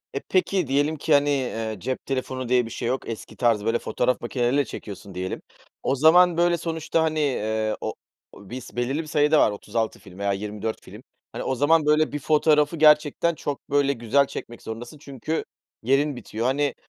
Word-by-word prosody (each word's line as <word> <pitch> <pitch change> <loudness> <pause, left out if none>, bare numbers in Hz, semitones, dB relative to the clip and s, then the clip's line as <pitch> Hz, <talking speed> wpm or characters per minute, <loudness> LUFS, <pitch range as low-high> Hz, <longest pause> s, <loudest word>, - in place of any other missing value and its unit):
Eee, 140 - -1
peki, 185 -2 +1
diyelim 145 +4 +1
ki, 155 +2 -1
hani, 145 0 +4
eee, 115 -5 -2
cep 130 +4 -4
telefonu 130 -2 -3
diye 125 -2 +3
bir - - -8
şey 120 +1 -3
yok 130 0 -2
eski 115 - -7
tarz, 115 -4 +2
böyle, 115 +1 +1
fotoğraf 125 0 0
makineleriyle 125 +3 0
çekiyorsun, 100 -5 -9
diyelim. 95 +1 -4 0.4
O - - +1
zaman, 170 +4 +6
böyle, 175 0 +3
sonuçta, 165 0 -1
hani, 155 -1 0
eee, 110 -6 0
o - - -3 0.4
o 100 -1 -14
biz 125 0 -8
belirli 135 +6 -1
bir - - -11
sayıda 150 +1 +3
var - - +4
36 110 +2 -3
film 95 -2 -15
veya 100 0 0
24 105 +2 -4
film. - - -12 0.3
Hani, - - -5
o 130 - 0
zaman, 150 +3 +3
böyle, 150 0 +3
bir 145 - -2
fotoğrafı 150 +1 +3
gerçekten 155 +2 +4
çok, 145 -2 -6
böyle, 140 0 +3
güzel 130 +3 +2
çekmek 120 -3 -8
zorundasın 120 +7 -8
çünkü 140 +3 -4 0.4
yerin 135 +3 +2
bitiyor. 115 0 -4
Hani, 140 +1 +1
135 Hz, 190 wpm, -24 LUFS, 115-150 Hz, 0.4 s, zaman